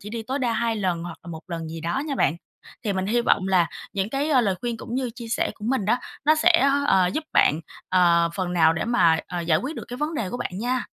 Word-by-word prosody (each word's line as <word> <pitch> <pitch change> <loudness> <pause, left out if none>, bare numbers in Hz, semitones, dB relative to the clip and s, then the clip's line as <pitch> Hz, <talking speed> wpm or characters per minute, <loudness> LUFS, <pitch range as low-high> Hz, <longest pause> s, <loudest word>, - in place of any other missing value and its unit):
chỉ 210 - -9
đi 230 0 -4
tối 260 +5 -3
đa 245 -4 0
2 230 0 0
lần 180 -5 -1
hoặc 175 -1 -7
là 170 - -9
1 160 -1 -8
lần 165 -2 -5
gì 165 +1 -7
đó 170 - -2
nha 290 - -2
bạn. 170 - +1 0.5
Thì 205 - 0
mình 190 -1 -2
hy 235 +4 +2
vọng 195 -5 +2
là 180 -3 +4 0.3
những 195 0 -1
cái, 280 +4 -1
a, 265 -4 +5
lời 200 -5 +1
khuyên 240 -1 -3
cũng 230 - -7
như 255 -1 -1
chia 235 -2 -8
sẻ 230 - 0
của 210 - -11
mình 260 -5 0
đó, 225 +5 +3 0.3
nó 310 - +5
sẽ, 325 -2 +4 0.2
ờ, 190 -2 +4
giúp 305 - -2
bạn, 150 - +4 0.3
ờ, 170 -2 +4
phần 185 -2 -2
nào 165 -2 +4
để 160 - -2
mà, 170 -9 +3
ờ, 175 -1 -4
giải 165 -2 +2
quyết 290 - -5
được - - -6
cái 245 - -6
vấn 300 +4 -2
đề 215 -10 -2
của 245 - -3
bạn 245 - -4
nha. 245 +3 -1
210 Hz, 280 wpm, -24 LUFS, 175-250 Hz, 0.5 s, a